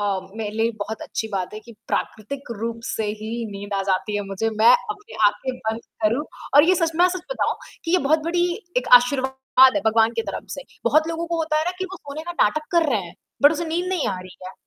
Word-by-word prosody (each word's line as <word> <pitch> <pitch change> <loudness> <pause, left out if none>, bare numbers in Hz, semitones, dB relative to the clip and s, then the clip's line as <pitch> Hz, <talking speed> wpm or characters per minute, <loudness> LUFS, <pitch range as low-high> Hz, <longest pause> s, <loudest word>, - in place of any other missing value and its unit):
अ, 205 - 0 0.3
मेरे 220 -2 -3
लिए 225 - +2
ये 230 - -2
बहुत 220 +2 -6
अच्छी 220 - -4
बात 185 0 -3
है 215 - -7
कि 235 - -14 0.2
प्राकृतिक 250 +5 -4
रूप 230 0 -3
से 220 - -2 0.2
ही 215 +1 -5 0.2
नींद 200 0 -6
आ 195 - 0
जाती 190 +2 0
है 205 - -1
मुझे, 195 +3 -2
मैं 220 +2 +5 0.2
अपने 420 -1 -8
आँखें 250 +5 -1
बंद 220 +1 -1 0.2
करूँ 230 +7 +2 0.3
और 290 - +9
ये 370 - +6
सच 330 -2 +1
में 350 - +5
अ, - - +5
सच 365 -1 -4
बताऊँ - - 0 0.3
कि 330 - -3
ये 365 - +5
बहुत 315 +2 +5
बड़ी 350 +1 +2 0.3
एक 250 0 0
आशीर्वाद 265 0 +3
है - - +2
भगवान 225 +1 +4
की - - +1
तरफ - - -5
से। - - -5 0.2
बहुत 310 +1 +3
लोगों 330 +1 -3
को 340 0 -2
होता 310 -1 +1
है 310 - 0
ना 355 - 0
कि 375 - -2
वो - - -5
सोने 290 -1 -8
का 345 +1 -5
नाटक 305 +9 +1
कर 335 -3 +3
रहे 220 - +2
हैं, 170 - -13 0.3
बट 290 +2 +8
उसे 325 +2 -2
नींद 340 +3 -1
नहीं 370 -4 0
आ 190 - -2
रही 185 0 -12
है, 185 - -8
260 Hz, 255 wpm, -23 LUFS, 215-325 Hz, 0.3 s, और